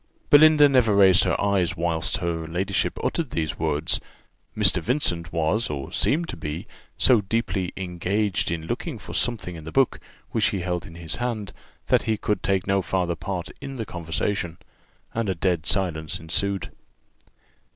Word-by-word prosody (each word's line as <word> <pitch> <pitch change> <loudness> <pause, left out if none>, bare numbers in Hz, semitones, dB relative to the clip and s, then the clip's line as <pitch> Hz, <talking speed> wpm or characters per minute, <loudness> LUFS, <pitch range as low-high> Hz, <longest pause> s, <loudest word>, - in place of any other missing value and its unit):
'" - - -38
Belinda 150 0 +8
never 125 -7 +3
raised 95 -2 +6
her - - +1
eyes 100 -4 +1
whilst 85 -1 0
her 80 -2 -2
ladyship 90 +3 -1
uttered 165 -6 -1
these 80 -6 -3
words; 80 0 0 0.6
Mr. - - +4
Vincent 85 - -1
was, 85 +8 +1
or 70 -2 -5
seemed 165 +4 +1
to - - -4
be, 75 +1 -5 0.3
so 125 -5 +5
deeply 100 -3 -1
engaged 95 +2 -1
in 85 -1 -3
looking - - -4
for - - -10
something 105 -7 -1
in 80 - -9
the 80 - -7
book, 135 +5 +2 0.3
which - - +1
he 95 - -1
held 90 -1 -3
in 80 - -12
his 85 -1 -4
hand, 115 -6 -3 0.3
that - - +3
he 110 - +2
could 105 -2 -1
take 95 -2 +1
no 95 0 +2
farther 90 -1 -1
part 90 -2 -4
in 135 -1 -6
the 115 -3 -4
conversation; 85 0 -3 0.6
and 115 -3 -1
a 95 - 0
dead 85 -2 0
silence 85 -6 -1
ensued. 95 +4 -2
95 Hz, 170 wpm, -24 LUFS, 85-105 Hz, 0.6 s, Belinda